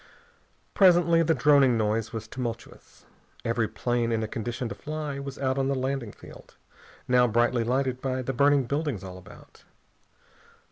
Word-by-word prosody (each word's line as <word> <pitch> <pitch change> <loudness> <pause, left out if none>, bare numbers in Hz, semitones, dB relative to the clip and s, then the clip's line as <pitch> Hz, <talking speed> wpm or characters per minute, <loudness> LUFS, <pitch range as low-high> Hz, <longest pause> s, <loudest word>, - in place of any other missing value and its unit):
Presently 175 -3 +5
the 165 0 +2
droning 135 -2 +4
noise 110 0 -1
was 115 -1 -6
tumultuous. 115 -1 -7 0.4
Every - - 0
plane 120 -1 -1
in 115 -1 0
a - - -2
condition 120 +3 -4
to - - -4
fly 150 +3 -5
was 140 0 -7
out 130 0 -1
on 135 - +1
the 140 - 0
landing 130 -3 -3
field, - - -15 0.5
now 125 -1 +4
brightly 120 +1 +1
lighted 130 +1 -1
by 130 -1 -2
the 135 - -3
burning 140 +2 +3
buildings 140 - -2
all 95 -1 -8
about. 90 - -16
130 Hz, 155 wpm, -26 LUFS, 115-140 Hz, 0.5 s, Presently